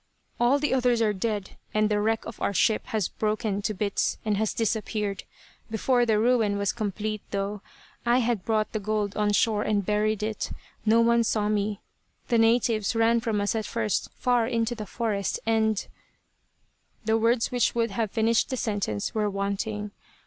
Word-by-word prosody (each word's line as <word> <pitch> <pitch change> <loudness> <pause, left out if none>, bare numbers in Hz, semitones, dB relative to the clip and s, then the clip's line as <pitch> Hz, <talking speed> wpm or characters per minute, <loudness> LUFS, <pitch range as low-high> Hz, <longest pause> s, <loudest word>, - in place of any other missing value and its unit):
" - - -40
all 240 +4 +4
the 290 -1 0
others 250 -2 +2
are 215 -2 +2
dead, 205 0 -3 0.2
and 215 0 +3
the 210 -1 +1
wreck 220 +1 0
of 230 - -9
our 200 - 0
ship 220 +2 +2
has 215 -5 0
broken 210 -1 -1
to 210 - -1
bits 200 0 -1
and 210 -1 +1
has 215 +1 0
disappeared. 215 -2 -2 0.4
Before 240 +2 +2
the 220 -2 +3
ruin 220 -3 +2
was 200 -1 +1
complete, 215 -1 -3
though, 200 0 -3 0.4
I 240 +1 +3
had 235 -5 0
brought 215 0 0
the 215 - -2
gold 210 -1 -1
on 210 -1 +1
shore 210 +1 +2
and 205 -2 0
buried 210 +1 +1
it. 215 0 -3 0.4
No 225 +2 +5
one 235 0 +4
saw 215 -2 0
me. 210 -1 -1 0.5
The 235 -2 +3
natives 225 -2 +2
ran 230 +1 +3
from 225 -2 -1
us 205 0 0
at 220 -1 -2
first, 225 -3 -1
far 245 -3 +2
into 230 -1 0
the 215 -3 -7
forest, 210 -4 -2
and 220 -2 +1 0.6
" - - -42
The 220 +1 +2
words 230 +1 +2
which 245 -2 +1
would 230 -2 +1
have 220 +2 -1
finished 225 +4 +2
the 260 - -2
sentence 200 - -2
were 210 -1 +1
wanting. 200 +1 -3
215 Hz, 185 wpm, -26 LUFS, 205-230 Hz, 0.6 s, No